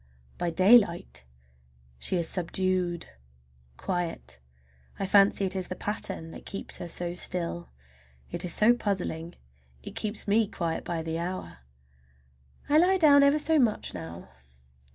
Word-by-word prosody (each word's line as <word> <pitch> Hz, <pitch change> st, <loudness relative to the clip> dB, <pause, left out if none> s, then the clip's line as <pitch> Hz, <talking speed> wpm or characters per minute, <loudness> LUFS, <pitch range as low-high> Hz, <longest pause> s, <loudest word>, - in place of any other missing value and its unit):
By 175 Hz, -, 0 dB
daylight 185 Hz, -, +4 dB, 0.7 s
she 185 Hz, -, -1 dB
is 170 Hz, -2 st, +1 dB
subdued, 180 Hz, -1 st, 0 dB, 0.7 s
quiet. 175 Hz, -, -3 dB, 0.6 s
I 195 Hz, -, -2 dB
fancy 195 Hz, 0 st, +4 dB
it 190 Hz, 0 st, -2 dB
is 185 Hz, -1 st, -2 dB
the 185 Hz, -, -5 dB
pattern 185 Hz, -6 st, -3 dB
that -, -, -10 dB
keeps 195 Hz, -, -6 dB
her 175 Hz, -, -5 dB
so 175 Hz, 0 st, -3 dB
still. 175 Hz, -1 st, -4 dB, 0.6 s
It -, -, -4 dB
is 180 Hz, -, -1 dB
so 215 Hz, +7 st, +5 dB
puzzling. 180 Hz, -7 st, -3 dB, 0.5 s
It -, -, -8 dB
keeps 215 Hz, 0 st, -3 dB
me 215 Hz, +1 st, +3 dB
quiet 170 Hz, -5 st, -3 dB
by 170 Hz, -2 st, -3 dB
the 165 Hz, 0 st, -3 dB
hour. 170 Hz, -, -5 dB, 1.1 s
I 300 Hz, +2 st, +5 dB
lie 375 Hz, +3 st, +4 dB
down 290 Hz, -5 st, +6 dB
ever 280 Hz, +1 st, +5 dB
so 315 Hz, +1 st, +3 dB
much 230 Hz, -5 st, +1 dB
now. 85 Hz, 0 st, -8 dB
185 Hz, 140 wpm, -28 LUFS, 170-210 Hz, 1.1 s, down